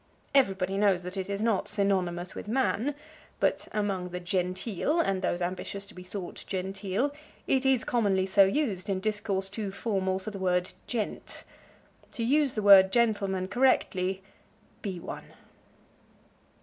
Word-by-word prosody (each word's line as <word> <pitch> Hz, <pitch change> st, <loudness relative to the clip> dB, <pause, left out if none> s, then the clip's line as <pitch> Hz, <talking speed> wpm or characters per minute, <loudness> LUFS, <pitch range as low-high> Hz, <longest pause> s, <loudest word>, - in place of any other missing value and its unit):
Everybody 195 Hz, -7 st, +2 dB
knows 195 Hz, -4 st, +3 dB
that 180 Hz, +2 st, -6 dB
it 190 Hz, 0 st, -4 dB
is 200 Hz, +1 st, -2 dB
not 225 Hz, -4 st, +1 dB
synonymous 185 Hz, -3 st, 0 dB
with -, -, -8 dB
man, 260 Hz, +3 st, 0 dB, 0.4 s
but -, -, +1 dB
among 200 Hz, -4 st, -1 dB
the 180 Hz, 0 st, -5 dB
"genteel" 185 Hz, -, -1 dB
and 195 Hz, -, +1 dB
those 175 Hz, -1 st, -1 dB
ambitious 185 Hz, +2 st, -4 dB
to -, -, -10 dB
be 180 Hz, -, -10 dB
thought 185 Hz, 0 st, -7 dB
"genteel" 195 Hz, +7 st, -2 dB, 0.3 s
it 265 Hz, 0 st, +2 dB
is 265 Hz, -3 st, +3 dB
commonly 200 Hz, -6 st, +1 dB
so 195 Hz, +1 st, +5 dB
used 195 Hz, -3 st, 0 dB
in 190 Hz, -1 st, 0 dB
discourse 205 Hz, -1 st, -1 dB
too 205 Hz, +1 st, -4 dB
formal 190 Hz, -2 st, -1 dB
for 195 Hz, +3 st, -6 dB
the 200 Hz, -, -7 dB
word 180 Hz, -1 st, 0 dB
"gent." 225 Hz, -4 st, -4 dB, 0.7 s
To 230 Hz, -, -3 dB
use 280 Hz, +2 st, +2 dB
the 215 Hz, -, -1 dB
word 195 Hz, -2 st, +8 dB
gentleman 200 Hz, -5 st, +1 dB
correctly, 190 Hz, -5 st, +1 dB, 0.6 s
be 190 Hz, -4 st, -4 dB
one. -, -, -8 dB
195 Hz, 150 wpm, -28 LUFS, 185-220 Hz, 0.7 s, word